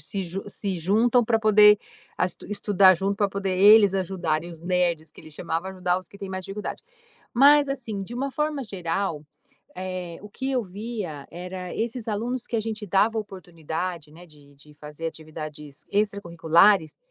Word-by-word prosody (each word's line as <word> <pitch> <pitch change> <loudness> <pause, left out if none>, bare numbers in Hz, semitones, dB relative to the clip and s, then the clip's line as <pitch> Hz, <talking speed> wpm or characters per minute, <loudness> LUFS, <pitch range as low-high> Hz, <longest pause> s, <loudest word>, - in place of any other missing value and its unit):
se 195 - -4
ju 185 +2 -6
se 195 -2 -3
juntam 225 +8 +3
para 225 0 +2
poder 210 -1 +6 0.4
as 180 - 0
estudar 200 -2 +4
junto, 195 +3 -1
para 205 -1 +1
poder 195 -1 -2
eles 205 0 +7
ajudarem, 175 -4 -1
os 165 -1 -12
nerds 175 -3 0
que - - -15
eles 155 -1 -13
chamavam 170 +3 -3
ajudar 180 -1 0
os 185 - -10
que - - -14
têm 200 -1 -7
mais 185 0 -5
dificuldade. 200 +3 -6 0.5
Mas, 285 +3 +6
assim, 235 -7 -4
de 235 - -8
uma 270 +3 -2
forma 300 -1 -2
geral, 175 -5 -3 0.5
eh, 185 -2 -5
o 210 - -10
que 265 +5 -4
eu 250 -3 +1
via 195 -7 -6
era 180 +1 -7
esses 230 +1 -3
alunos 235 +4 -2
que 235 - -2
a - - +1
gente 220 -1 -5
dava 210 +4 +2
oportunidade, 170 -4 -6
né, 175 +2 -14
de 145 -3 -19
de 150 +2 -18
fazer 150 +2 -7
atividades 155 -2 -9
extracurriculares, 175 -3 +3
190 Hz, 170 wpm, -25 LUFS, 170-210 Hz, 0.5 s, eles